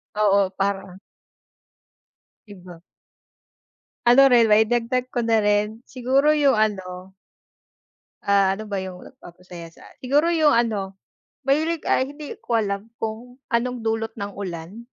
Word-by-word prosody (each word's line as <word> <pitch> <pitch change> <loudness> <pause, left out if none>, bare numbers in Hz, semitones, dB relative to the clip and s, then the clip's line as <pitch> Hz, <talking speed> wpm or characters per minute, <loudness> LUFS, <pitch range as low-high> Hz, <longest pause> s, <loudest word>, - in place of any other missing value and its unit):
Oo, 200 -2 +3
parang 195 -1 -3 1.5
Iba. 180 -4 -13 1.2
Ano 275 +3 +7
rin 235 -4 +4
mai-dagdag 240 +4 +2
ko 240 - 0
na 225 -1 +2
rin, 210 +1 0
siguro 270 +4 +2
yung 280 -7 +3
ano 190 -3 -3 1.1
ah. 200 -1 +2
ano 215 +2 -8
ba 200 - -2
yung 185 -1 -8
nagpapasaya 175 -8 -13
sa - - -16 0.2
siguro 290 +6 +2
yung 315 -3 +3
ano, 215 -5 0 0.5
mahilig, 315 +4 0
ay 260 +1 +1
hindi 290 0 -9
ko 235 - -1
alam 200 0 -2
kung 230 +3 -6 0.2
anong 240 0 -1
dulot 225 0 -2
ng 200 -1 -5
ulan? 190 +4 -8
220 Hz, 125 wpm, -22 LUFS, 195-250 Hz, 1.5 s, Ano